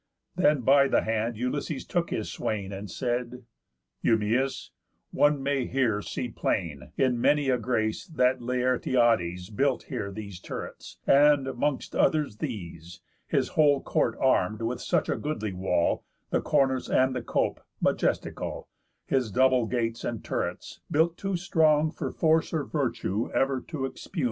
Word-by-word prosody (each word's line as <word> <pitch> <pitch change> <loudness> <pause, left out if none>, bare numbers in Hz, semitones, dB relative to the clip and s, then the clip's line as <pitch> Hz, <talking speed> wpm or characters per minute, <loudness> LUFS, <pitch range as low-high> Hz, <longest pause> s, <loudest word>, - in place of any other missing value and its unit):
Then 150 -6 +3
by 140 +3 +5
the - - +2
hand 110 +1 -1
Ulysses 130 +4 -3
took 175 -2 -1
his 110 - -3
swain, 100 -3 -3
And 100 +1 -6
said: 125 +3 -3 0.6
"Eumæus, 115 +5 +1 0.4
one 145 -2 +3
may 140 -2 0
here 120 -6 +1
see 125 - -4
plain, 85 - -3
In 125 -3 +2
many 145 0 +3
a 125 -1 +2
grace, 110 -2 -1
that 130 -4 +2
Laertiades 120 -7 +1
Built 135 +2 +1
here 100 - -3
these 100 -3 -8
turrets, - - -8
and,'mongst 145 0 +3
others 150 -9 +2
these, 85 - -6 0.3
His - - +1
whole 145 -3 +4
court - - 0
arm'd 110 -4 +2
with 120 +2 -2
such 170 -4 +1
a - - 0
goodly 110 -10 -3
wall, 90 -2 0 0.3
The - - +2
cornice, 130 -2 +1
and 130 0 +3
the 125 - -2
cope, - - -1 0.2
majestical, - - -1 0.4
His 130 -4 0
double 130 +1 +3
gates, 115 -1 -2
and 115 -3 -4
turrets, - - -4
built 165 +3 +2
too 195 +1 -2
strong 160 -4 +3
For - - -4
force 160 0 +2
or 155 -3 0
virtue 120 -7 -1
ever 135 -1 +1
to 155 -5 -5
expugn. 135 +7 -7
125 Hz, 145 wpm, -27 LUFS, 110-145 Hz, 0.6 s, by